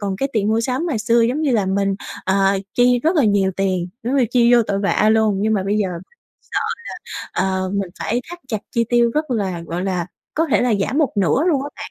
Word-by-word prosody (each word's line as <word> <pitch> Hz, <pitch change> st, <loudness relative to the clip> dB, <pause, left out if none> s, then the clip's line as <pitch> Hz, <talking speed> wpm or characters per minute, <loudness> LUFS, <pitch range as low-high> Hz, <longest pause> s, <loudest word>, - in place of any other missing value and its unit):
còn 200 Hz, -2 st, -2 dB
cái 275 Hz, +7 st, -1 dB
tiền 210 Hz, -2 st, +1 dB
mua 220 Hz, +1 st, +2 dB
sắm 255 Hz, +8 st, -1 dB
ngày 260 Hz, -9 st, -1 dB
xưa 230 Hz, +2 st, +2 dB
giống 245 Hz, +7 st, +1 dB
như 300 Hz, -, +1 dB
là 210 Hz, -4 st, +1 dB
mình, 195 Hz, +1 st, +1 dB, 0.3 s
ờ, 195 Hz, +1 st, +2 dB, 0.2 s
chi 245 Hz, 0 st, +4 dB
rất 330 Hz, +3 st, +2 dB
là 290 Hz, -, +4 dB
nhiều 200 Hz, -2 st, +2 dB
tiền, 185 Hz, -2 st, 0 dB
giống 250 Hz, +4 st, -1 dB
như 260 Hz, -, +4 dB
chi 240 Hz, -1 st, +4 dB
vô 235 Hz, -, +5 dB
tội 200 Hz, -2 st, -2 dB
vạ 205 Hz, +1 st, +2 dB
luôn 220 Hz, -2 st, +3 dB
nhưng 220 Hz, +1 st, +1 dB
mà 195 Hz, -, 0 dB
bây 200 Hz, +2 st, 0 dB
giờ 200 Hz, -, +1 dB, 0.5 s
sợ -, -, -3 dB, 0.8 s
là, 190 Hz, -, 0 dB
ờ, 185 Hz, -, -3 dB
mình 195 Hz, -3 st, -2 dB
phải 240 Hz, +3 st, -1 dB
thắt 350 Hz, -, -7 dB
chặt 215 Hz, -, -1 dB
chi 230 Hz, 0 st, +1 dB
tiêu 240 Hz, 0 st, +3 dB
rất 305 Hz, -2 st, -1 dB
là 195 Hz, -7 st, -1 dB
gọi 175 Hz, +3 st, -3 dB
là, 180 Hz, -3 st, -1 dB, 0.3 s
có 325 Hz, +2 st, +1 dB
thể 210 Hz, -, +3 dB
là 245 Hz, -3 st, +2 dB
giảm 270 Hz, +9 st, 0 dB
một 300 Hz, -, +2 dB
nửa 200 Hz, -, +2 dB
luôn 275 Hz, -5 st, +2 dB
á 285 Hz, -, -4 dB
bạn, -, -, -8 dB
220 Hz, 250 wpm, -20 LUFS, 195-250 Hz, 0.8 s, vô